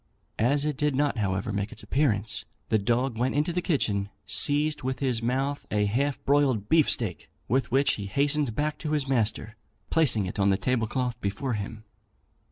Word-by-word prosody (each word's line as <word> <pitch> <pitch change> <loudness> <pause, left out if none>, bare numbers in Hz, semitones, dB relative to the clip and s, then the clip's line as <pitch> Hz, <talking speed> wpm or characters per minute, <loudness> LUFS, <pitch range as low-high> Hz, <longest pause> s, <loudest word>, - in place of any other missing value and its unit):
As 140 +6 +2
it 150 -3 -1
did 150 -2 +1
not, 140 -3 +1
however, 100 0 -1
make 100 +1 -2
its - - -6
appearance, 110 -3 0 0.3
the 110 - +3
dog 120 +3 0
went 125 +3 0
into 150 +4 +1
the 180 - 0
kitchen, 105 - 0 0.2
seized 150 +1 +2
with 130 0 -2
his 125 -4 -1
mouth 135 +4 -1
a 105 -1 +1
half 135 +7 0
broiled 135 -7 +2
beefsteak, 125 - +1 0.2
with 130 +1 +1
which 135 +3 +3
he 100 -2 -5
hastened 140 +2 +1
back 150 0 -1
to 155 -1 -3
his 145 -3 0
master, 110 -3 -1 0.4
placing 135 -11 +4
it 95 - -5
on 100 0 +4
the 95 - +3
table 115 +2 0
cloth 125 0 -2
before 120 +6 -2
him. 110 +1 -5
125 Hz, 180 wpm, -27 LUFS, 105-145 Hz, 0.4 s, placing